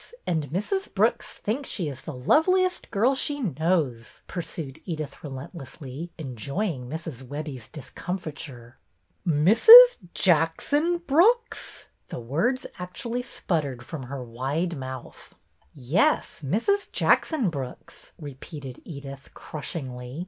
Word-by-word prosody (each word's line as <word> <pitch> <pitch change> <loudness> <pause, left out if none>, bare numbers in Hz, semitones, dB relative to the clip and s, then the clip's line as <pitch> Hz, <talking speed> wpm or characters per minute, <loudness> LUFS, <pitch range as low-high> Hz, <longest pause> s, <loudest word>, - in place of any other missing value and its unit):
And 160 -5 -1
Mrs. 210 - -2
Brooks - - 0
thinks 255 +7 -3
she 180 -7 -1
is 135 -3 -6
the 155 - -7
loveliest 365 - +2
girl 230 +5 +3
she 290 +2 -1
knows," 160 - -1
pursued 160 -6 -6
Edyth, 155 -4 -5
relent 135 0 -7
lessly, 145 0 -8
enjoying 140 - -3
Mrs. 160 -4 -6
Webbie's 140 -2 -6
discomfiture. 145 -6 -7 0.3
" - - -44
Mrs. 230 - +9 0.2
Jackson 195 - +2
Brooks? 445 - +2
" - - -46
The - - -5
words 165 - 0
actually 230 +7 -3
sputtered 145 - -3
from 155 0 -6
her 130 +1 -6
wide 135 +9 -2
mouth. 130 -2 -8 0.3
" - - -35
Yes, 155 - +1
Mrs. 235 - 0
Jackson 260 - +2
Brooks," 135 -5 -8
repeated 140 -2 -9
Edyth, 140 -3 -9
crushingly. 130 -3 -6
155 Hz, 120 wpm, -26 LUFS, 135-215 Hz, 0.3 s, Mrs